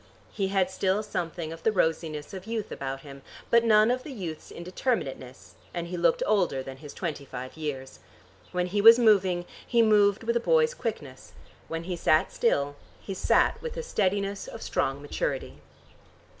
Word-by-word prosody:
He 195 Hz, -2 st, -1 dB
had 190 Hz, -1 st, +1 dB
still 190 Hz, +2 st, 0 dB
something 170 Hz, -5 st, -4 dB
of 165 Hz, -, -11 dB
the 220 Hz, -, +2 dB
rosiness 160 Hz, -5 st, -1 dB
of 190 Hz, +1 st, -8 dB
youth 225 Hz, -2 st, -3 dB
about 135 Hz, 0 st, -4 dB
him, 140 Hz, -1 st, -11 dB, 0.3 s
but 235 Hz, 0 st, +6 dB
none 215 Hz, 0 st, +5 dB
of 255 Hz, +1 st, -1 dB
youth's 185 Hz, -, -7 dB
indeterminateness, 170 Hz, -, -4 dB, 0.2 s
and 170 Hz, 0 st, -3 dB
he 180 Hz, -, -4 dB
looked 170 Hz, -1 st, +2 dB
older 180 Hz, -11 st, +1 dB
than 130 Hz, 0 st, -8 dB
his 145 Hz, 0 st, -10 dB
twenty 160 Hz, -6 st, -4 dB
five 130 Hz, -1 st, -8 dB
years. 140 Hz, -4 st, -5 dB, 0.5 s
When 180 Hz, 0 st, 0 dB
he 200 Hz, +3 st, 0 dB
was 230 Hz, +2 st, +10 dB
moving, 190 Hz, -6 st, +3 dB, 0.2 s
he 235 Hz, -1 st, +4 dB
moved 210 Hz, -1 st, +4 dB
with 235 Hz, +1 st, 0 dB
a -, -, +4 dB
boy's 475 Hz, -, +3 dB
quickness; 160 Hz, -, -6 dB, 0.3 s
when 165 Hz, 0 st, -4 dB
he 180 Hz, +1 st, -3 dB
sat 155 Hz, -2 st, +2 dB
still 145 Hz, -11 st, +1 dB, 0.2 s
he 195 Hz, -, -6 dB
sat 190 Hz, -, +2 dB
with 475 Hz, -1 st, -5 dB
the 485 Hz, -, -4 dB
steadiness 200 Hz, -, -1 dB
of 230 Hz, -, -8 dB
strong 135 Hz, +2 st, -1 dB
maturity. 145 Hz, -, -3 dB
185 Hz, 170 wpm, -27 LUFS, 155-215 Hz, 0.5 s, was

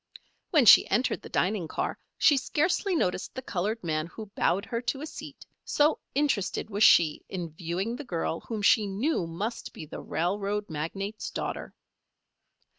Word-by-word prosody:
When 300 Hz, -7 st, +4 dB
she -, -, +8 dB
entered 250 Hz, -, +1 dB
the -, -, -10 dB
dining 185 Hz, -2 st, 0 dB
car -, -, -3 dB, 0.2 s
she 295 Hz, -, +5 dB
scarcely 345 Hz, -, 0 dB
noticed 180 Hz, -, -1 dB
the 260 Hz, -, -5 dB
colored 210 Hz, +2 st, -2 dB
man 155 Hz, -1 st, -1 dB
who 210 Hz, +3 st, -10 dB
bowed 200 Hz, +4 st, +1 dB
her 230 Hz, 0 st, -3 dB
to 265 Hz, +3 st, -2 dB
a -, -, -4 dB
seat, 315 Hz, -, -10 dB, 0.2 s
so 300 Hz, +1 st, +2 dB, 0.2 s
interested 270 Hz, -7 st, 0 dB
was 205 Hz, +2 st, +1 dB
she 160 Hz, -7 st, +5 dB
in 175 Hz, -4 st, -5 dB
viewing 180 Hz, +7 st, -3 dB
the 295 Hz, -, -7 dB
girl 165 Hz, -, -2 dB
whom 220 Hz, -3 st, -5 dB
she 215 Hz, -1 st, +5 dB
knew 200 Hz, -, -1 dB
must 200 Hz, +8 st, -5 dB
be 155 Hz, -, -8 dB
the 150 Hz, -, -8 dB
railroad 200 Hz, +4 st, -2 dB
magnate's 195 Hz, +8 st, -4 dB
daughter. -, -, -5 dB
205 Hz, 165 wpm, -28 LUFS, 175-245 Hz, 0.2 s, she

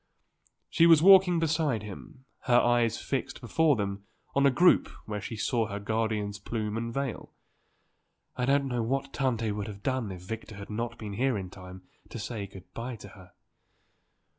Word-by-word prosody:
She 165 Hz, -, +4 dB
was 165 Hz, -2 st, +7 dB
walking 190 Hz, -2 st, +7 dB
beside 155 Hz, -8 st, 0 dB
him, 105 Hz, +5 st, -10 dB, 0.2 s
her 120 Hz, -1 st, +5 dB
eyes 120 Hz, -2 st, +2 dB
fixed 130 Hz, -1 st, -3 dB
before 150 Hz, +5 st, +2 dB
them 100 Hz, -2 st, -3 dB, 0.3 s
on 140 Hz, -, +2 dB
the 140 Hz, -, +6 dB
group 175 Hz, +7 st, +4 dB, 0.2 s
where 105 Hz, -1 st, -4 dB
she 115 Hz, -, -6 dB
saw 115 Hz, +1 st, 0 dB
her 100 Hz, -1 st, -5 dB
guardian's 105 Hz, -1 st, -2 dB
plume 105 Hz, 0 st, -3 dB
and 115 Hz, +1 st, -3 dB
veil. 135 Hz, -1 st, -4 dB, 1.0 s
"I 125 Hz, -, -1 dB
don't 140 Hz, 0 st, +3 dB
know 125 Hz, -2 st, -1 dB
what 135 Hz, +4 st, -2 dB
Tante 115 Hz, -5 st, 0 dB
would 105 Hz, -1 st, -4 dB
have 100 Hz, -1 st, -9 dB
done 130 Hz, -6 st, -1 dB
if 90 Hz, -1 st, -9 dB
Victor 110 Hz, +2 st, -7 dB
had 100 Hz, +1 st, -9 dB
not 115 Hz, +2 st, -3 dB
been 105 Hz, -3 st, -6 dB
here 125 Hz, +2 st, +1 dB
in 95 Hz, -2 st, -6 dB
time 90 Hz, -1 st, -11 dB, 0.3 s
to -, -, -7 dB
say 105 Hz, -2 st, -5 dB
good 95 Hz, -1 st, -14 dB
bye 120 Hz, +2 st, -5 dB
to -, -, -11 dB
her." 95 Hz, -3 st, -16 dB
115 Hz, 180 wpm, -28 LUFS, 105-135 Hz, 1.0 s, was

